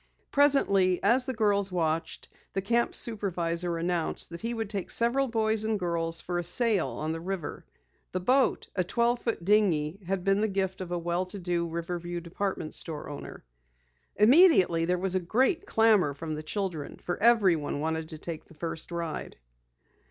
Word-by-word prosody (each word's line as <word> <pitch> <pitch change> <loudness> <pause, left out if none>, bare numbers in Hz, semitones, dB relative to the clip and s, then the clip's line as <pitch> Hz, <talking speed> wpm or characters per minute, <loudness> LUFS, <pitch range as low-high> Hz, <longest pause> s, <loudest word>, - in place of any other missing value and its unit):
Presently, 200 -11 +4
as 245 +5 +4
the 260 - -1
girls 200 -3 +1
watched, 165 -2 -2 0.3
the 195 - -1
camp 235 +4 +1
supervisor 175 -6 0
announced 170 -1 -2
that 170 - -7
he 230 +1 -2
would 225 -2 -3
take 200 -3 -4
several 250 +4 +2
boys 220 -2 +1
and 220 0 0
girls 165 -2 -1
for 175 -1 -3
a - - -2
sail 210 +2 +3
on 155 +1 -4
the 165 0 -4
river. 185 -2 -5 0.5
The 185 - -2
boat, 255 +8 +2
a 185 - +1
twelve 235 +6 0
foot 225 -8 -3
dinghy, 190 -5 +2
had 190 -1 -1
been 195 +1 +2
the 220 - +2
gift 190 -2 -2
of 185 - -6
a 175 - 0
well 175 +2 -2
to 200 - -7
do 175 -2 -1
Riverview 175 +1 -4
department 170 -1 -4
store 155 -4 -2
owner. 145 - -9 0.7
Immediately 210 - +5
there 180 +1 +1
was 185 +1 -1
a 185 - +2
great 260 - +1
clamor 210 -10 +3
from 155 +2 -5
the 155 - -4
children, 165 -3 -4
for 175 - -4
everyone 195 -11 +3
wanted 160 +1 -2
to 160 - -6
take 160 0 -7
the 165 - -18
first 165 0 -5
ride. 170 -2 -4
180 Hz, 175 wpm, -28 LUFS, 170-215 Hz, 0.7 s, Immediately